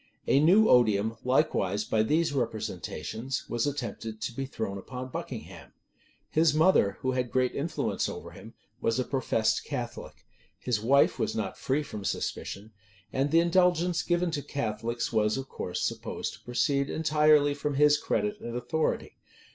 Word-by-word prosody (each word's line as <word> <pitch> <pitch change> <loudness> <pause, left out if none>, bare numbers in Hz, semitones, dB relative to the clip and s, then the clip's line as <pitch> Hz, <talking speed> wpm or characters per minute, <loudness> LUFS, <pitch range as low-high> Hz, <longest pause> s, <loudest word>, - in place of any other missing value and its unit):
A 135 - +4
new 190 +9 +6
odium, 110 -2 +4
likewise, 105 - +1
by 110 - +1
these 155 +7 +1
representations, 115 - -3
was 120 +3 -1
attempted 115 -5 -4
to 115 - -2
be 135 +2 -4
thrown 100 -6 -4
upon 130 +5 -7
Buckingham. - - -7 0.5
His 155 -1 +3
mother, 155 - +4
who 130 - 0
had 125 -1 -1
great 130 0 +1
influence 155 +3 -1
over - - -8
him, - - -13 0.3
was 115 +1 +1
a 130 - +1
professed 120 -4 0
Catholic; - - -6 0.3
his 120 -4 -1
wife 135 +5 +4
was - - -1
not 105 -4 -2
free 140 +3 -1
from 105 -7 -7
suspicion: 100 +2 -4 0.4
and 135 +2 +1
the 165 +3 +5
indulgence 175 -1 +2
given 175 0 0
to 150 -3 -2
Catholics 115 -3 -3
was 110 +1 +2
of 135 0 -5
course 90 -7 -4
supposed - - -3
to - - -14
proceed 140 +3 0
entirely 150 -2 +3
from 145 0 -3
his 150 +1 +5
credit 210 +5 -1
and 120 0 -6
authority. 155 +6 -2
130 Hz, 155 wpm, -28 LUFS, 110-150 Hz, 0.5 s, new